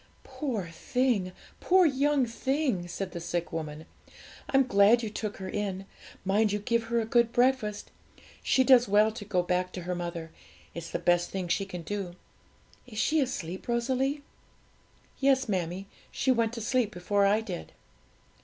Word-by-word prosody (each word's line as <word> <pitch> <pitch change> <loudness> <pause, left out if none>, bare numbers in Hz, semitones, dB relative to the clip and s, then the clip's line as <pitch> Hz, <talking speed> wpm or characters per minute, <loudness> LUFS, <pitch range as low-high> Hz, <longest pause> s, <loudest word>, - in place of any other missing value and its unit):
'Poor 245 - -3
thing! 205 +2 0 0.3
poor 370 0 +4
young 280 -2 +2
thing!' 250 - -1
said 185 +1 -5
the 170 - -5
sick 170 0 -3
woman. 155 -1 -5 0.6
'I'm 270 -1 +4
glad 215 +1 +5
you 215 - -3
took 215 -1 -4
her 190 - -6
in; 195 -1 -3 0.4
mind 205 +2 +2
you 205 - 0
give 230 +2 0
her 235 +1 0
a 225 - -1
good 235 +1 +3
breakfast 245 -4 +1 0.5
She 260 - +3
does 250 -2 +6
well 210 +2 +4
to 220 -1 -8
go 185 -3 0
back 180 +1 0
to 180 - -6
her 180 +1 -2
mother; 170 -2 -5 0.4
it's 170 0 -7
the - - -2
best 175 0 +2
thing 190 -2 -3
she 185 +3 0
can 180 -3 -7
do. 195 -1 -4 0.7
Is 220 -4 -10
she 315 +8 +2
asleep, 190 -9 -4
Rosalie?' 260 +4 0 1.0
'Yes, 270 -1 +3
mammie 180 -2 -2
dear, 200 - -26
she 265 - +1
went 230 -2 +1
to 230 - -5
sleep 245 0 +1
before 200 +2 +1
I 210 +2 +3
did.' 80 - -6
210 Hz, 170 wpm, -28 LUFS, 180-250 Hz, 1.0 s, does